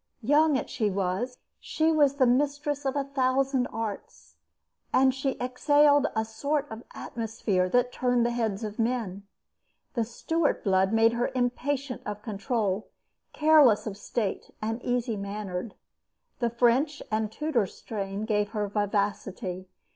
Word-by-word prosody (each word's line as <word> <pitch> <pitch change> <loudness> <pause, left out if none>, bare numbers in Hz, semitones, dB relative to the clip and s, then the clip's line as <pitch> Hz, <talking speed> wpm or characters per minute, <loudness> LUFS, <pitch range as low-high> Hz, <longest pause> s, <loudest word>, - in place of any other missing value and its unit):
Young 295 +3 +4
as - - -3
she 220 -4 0
was, 195 +6 -2 0.2
she 320 +1 +1
was 290 -3 +3
the 270 -2 +4
mistress 290 +3 0
of 270 - 0
a 280 - +1
thousand 265 -1 +1
arts, 220 -2 -6 0.6
and 260 0 +4
she 265 0 -2
exhaled 290 +3 +4
a 220 0 +1
sort 280 +7 -1
of 220 +1 -7
atmosphere 215 -5 -1
that 245 +3 +2
turned 245 -2 +1
the 240 - +1
heads 225 -3 -1
of 215 0 -6
men. 225 -5 -2 0.7
The 235 -4 +1
Stuart 295 +7 -1
blood 190 -1 +3
made 225 +1 +4
her 240 +1 0
impatient 255 +2 -1
of 210 0 -6
control, 210 -2 -2 0.4
careless 300 -8 +5
of 210 -3 -4
state, 205 0 -3
and 225 +2 -3
easy 245 -2 -1
mannered. 200 0 -5 0.6
The 235 - +1
French 250 +5 +2
and 215 0 +1
the - - -20
Tudor 290 -10 0
strain 200 +1 -5
gave 210 -2 0
her 210 -2 -1
vivacity. 200 -2 -2
235 Hz, 145 wpm, -27 LUFS, 210-270 Hz, 0.7 s, careless